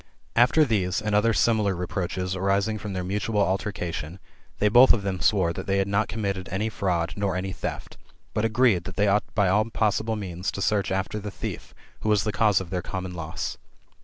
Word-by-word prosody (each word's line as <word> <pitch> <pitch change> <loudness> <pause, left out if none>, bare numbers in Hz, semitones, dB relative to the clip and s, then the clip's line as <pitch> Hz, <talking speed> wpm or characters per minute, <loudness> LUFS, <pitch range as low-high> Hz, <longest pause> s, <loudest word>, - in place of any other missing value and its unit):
"' - - -36
After 155 +4 +3
these, 95 -7 0
and 105 -1 -2
other 105 +3 +4
similar 110 -3 +2
re 90 +1 -3
proaches 90 +1 -3
arising 100 +3 0
from 105 -1 -5
their 90 -1 -2
mutual 105 +3 -1
altercation, 95 -4 -2 0.4
they 105 - +2
both 120 +5 +7
of 105 - -1
them 95 -2 -2
swore 90 -5 +2
that - - -7
they 100 0 +1
had 95 0 +1
not 100 +2 +1
committed 100 -4 -3
any 105 +4 -1
fraud, 90 -5 -1
nor 100 -2 -1
any 95 +1 -2
theft; - - -6 0.4
but 105 - 0
agreed, 115 -5 +3
that - - -7
they 105 0 +2
ought 100 0 +1
by 100 -3 +3
all 105 +4 +3
possible 110 0 0
means 90 -3 -4
to - - -5
search 100 0 +1
after 95 +2 -2
the 105 0 -5
thief, - - -7 0.2
who 110 - -2
was 105 -3 +3
the 105 - -1
cause 105 -2 +3
of 95 -2 -8
their 90 -2 -1
common 95 0 -5
loss. 80 -2 -5
100 Hz, 215 wpm, -25 LUFS, 95-105 Hz, 0.4 s, both